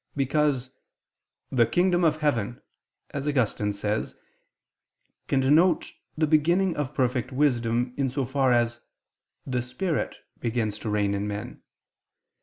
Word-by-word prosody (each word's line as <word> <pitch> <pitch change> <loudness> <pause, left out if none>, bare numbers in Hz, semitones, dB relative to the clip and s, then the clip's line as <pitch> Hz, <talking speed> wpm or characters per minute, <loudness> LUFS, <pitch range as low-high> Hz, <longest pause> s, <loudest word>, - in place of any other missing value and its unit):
Because 135 -2 +1 0.8
the 120 -4 +4
"kingdom 175 +7 +2
of 155 -2 +3
heaven," 120 -6 0 0.5
as 140 +1 -4
Augustine 115 -7 +1
says 105 +1 -2
(loc. - - -32
cit.), - - -44
can 135 - +2
denote 155 +5 +3 0.3
the 155 - +3
beginning 170 +4 +3
of 145 -1 -3
perfect 125 0 0
wisdom, 125 -3 +1
in 135 -2 +1
so 135 +1 -1
far 130 0 +1
as 120 -1 +2 0.7
"the 125 -2 -1
spirit" 150 +7 -2 0.2
begins 110 -3 -1
to 110 - -4
reign 105 -1 +1
in 100 +1 -2
men. 105 +4 -6
130 Hz, 135 wpm, -26 LUFS, 115-150 Hz, 0.8 s, the